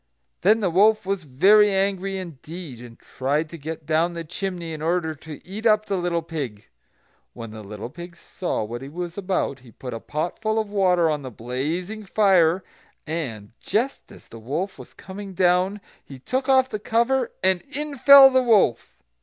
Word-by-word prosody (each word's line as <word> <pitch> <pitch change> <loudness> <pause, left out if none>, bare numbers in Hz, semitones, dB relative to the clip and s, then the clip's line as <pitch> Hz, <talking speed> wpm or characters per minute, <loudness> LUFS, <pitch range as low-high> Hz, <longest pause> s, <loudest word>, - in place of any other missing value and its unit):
Then 215 +4 +4
the 185 -4 +1
wolf 215 +4 +4
was 195 -3 -2
very 200 +10 +5
angry 195 0 0
indeed, 165 -5 -8
and 120 -1 -12
tried 145 +4 -2
to - - -7
get 160 +1 -7
down 165 +3 +1
the 170 -1 -5
chimney 175 0 -5
in 155 - -7
order 165 0 0
to 155 0 -11
eat 215 +5 -2
up 215 -1 +3
the 200 - -2
little 175 -2 -1
pig. 140 -11 -6 0.7
When 115 -1 -8
the 110 0 -9
little 105 +3 -8
pig 175 +2 -10
saw 175 - -4
what 120 +3 -6
he 135 - -8
was 175 +2 -6
about, 185 -8 -2
he 125 -2 -17
put 125 +3 -8
a 115 - -5
pot 155 +7 -4
full 220 0 0
of 215 -2 -1
water 180 -4 +3
on 150 -2 -1
the 130 - -7
blazing 155 - -4
fire, 190 -4 +3 0.4
and, 130 -11 -5
just 235 +7 -2
as - - -15
the 115 - -11
wolf 150 - -4
was - - -13
coming 195 0 -9
down, 180 +3 +2 0.2
he 135 - -11
took 260 - -3
off 260 -1 +5
the 215 - -5
cover, 235 +4 +1
and 185 -1 +3
in 295 +1 -4
fell 275 0 +9
the 260 0 +4
wolf. 220 - +2
175 Hz, 185 wpm, -23 LUFS, 150-205 Hz, 0.7 s, fell